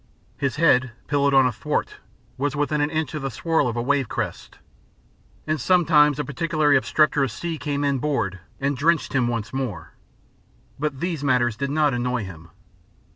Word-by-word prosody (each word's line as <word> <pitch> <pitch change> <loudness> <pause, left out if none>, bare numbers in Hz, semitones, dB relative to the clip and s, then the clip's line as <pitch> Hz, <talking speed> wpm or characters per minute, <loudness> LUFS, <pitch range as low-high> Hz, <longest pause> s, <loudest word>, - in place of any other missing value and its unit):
His 140 -2 -2
head, 130 -6 +3
pillowed 140 -1 +2
on 135 -1 +6
a 125 - +2
thwart, 110 - -3 0.4
was 145 +2 -2
within 145 +1 0
an 145 - +1
inch 155 -2 -2
of 155 - -4
the 135 - -2
swirl 160 +4 0
of 120 - -2
a 120 - -1
wave 135 -2 +1
crest, - - -5 0.9
and 155 -3 -1
sometimes 150 -2 +4
a 150 - -2
particularly 155 -1 +1
obstreperous 140 -1 +2
sea 165 +7 -5
came 145 -1 -2
in 140 -2 +1
board 115 -10 -1 0.2
and 140 +1 0
drenched 160 +5 +1
him 125 -3 +2
once 115 -1 -3
more. 120 -12 -4 0.9
But 145 -2 -3
these 170 -5 -2
matters 125 -4 +2
did 140 +4 -3
not 150 -1 +2
annoy 125 -1 -1
him. 85 -4 -10
140 Hz, 175 wpm, -23 LUFS, 125-150 Hz, 0.9 s, on